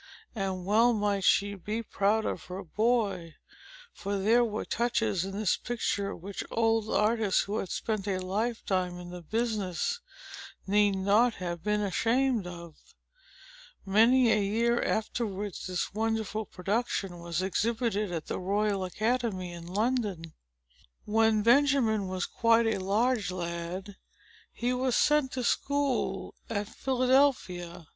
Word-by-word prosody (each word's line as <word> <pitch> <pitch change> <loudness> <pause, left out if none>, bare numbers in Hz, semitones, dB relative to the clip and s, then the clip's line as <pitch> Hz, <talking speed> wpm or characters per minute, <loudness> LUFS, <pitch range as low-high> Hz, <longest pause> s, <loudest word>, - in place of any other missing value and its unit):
And 190 -4 -3
well 225 +5 +4
might 205 -2 0
she 200 +2 +3
be 210 +4 -4
proud 215 +1 +1
of - - -3
her 185 +2 -6
boy; 205 -4 0 0.6
for 200 0 -3
there 225 +5 +4
were 215 -2 -3
touches 225 -5 0
in 195 - -6
this 210 -3 +1
picture, 205 -4 -2
which 195 +3 -6
old 225 -1 +1
artists, 215 -2 +2
who 205 +2 -2
had 190 - -4
spent 215 -3 -2
a 195 -2 0
lifetime 185 -2 -1
in 175 0 -9
the 180 0 -7
business, 220 - -1 0.7
need 205 0 +3
not 210 +5 +3
have 175 -2 -4
been 210 +2 0
ashamed 230 +2 +1
of. 170 -3 -11 0.9
Many 230 +5 +5
a 210 - +3
year 230 +4 +1
afterwards, 205 -4 -2
this 185 +1 -2
wonderful 220 -1 -1
production 195 -2 -2
was 170 +1 -3
exhibited 215 0 0
at 165 -3 -4
the - - -4
Royal 200 +1 0
Academy 215 -2 -1
in 170 0 -9
London. 200 -5 -1 0.7
When 220 0 +3
Benjamin 240 -5 +3
was 185 -1 -2
quite 230 0 +3
a 225 -3 +1
large 210 +3 +1
lad, 180 +2 -5 0.5
he 245 +1 -1
was 250 -1 0
sent 295 -3 +3
to 255 - -2
school 280 +1 0 0.2
at 205 -2 -2
Philadelphia. 250 - +1
210 Hz, 135 wpm, -29 LUFS, 185-230 Hz, 0.9 s, Many